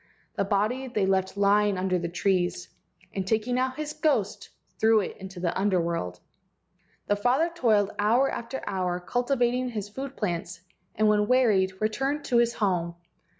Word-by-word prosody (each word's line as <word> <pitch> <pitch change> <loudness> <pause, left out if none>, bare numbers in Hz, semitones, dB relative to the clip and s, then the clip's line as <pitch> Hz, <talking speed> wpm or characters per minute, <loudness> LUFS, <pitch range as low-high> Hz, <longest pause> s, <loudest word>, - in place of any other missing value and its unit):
The - - 0
body 215 +7 0
they 215 -6 0
left 190 0 0
lying 205 0 +3
under 185 -1 0
the 170 0 -3
trees, 175 -1 0 0.4
and 190 -1 -3
taking 225 +4 0
out 260 0 0
his 300 0 -4
ghost 225 -10 0 0.3
threw 220 0 +5
it 200 - -4
into 190 -1 -9
the 175 -1 -1
Under 190 -1 +2
world. 165 - -3 0.9
The 205 - +1
father 255 +10 +1
toiled 215 - +2
hour 235 +6 +3
after 235 +3 -5
hour 180 -2 -1
cultivating 245 +4 0
his 210 -4 -5
food 270 +5 -7
plants, 175 -3 -3 0.3
and 215 +1 +2
when 210 0 +3
wearied 200 -7 +3
returned 270 +7 -1
to 240 - +2
his 235 0 +2
home. 175 -5 0
210 Hz, 160 wpm, -27 LUFS, 190-245 Hz, 0.9 s, threw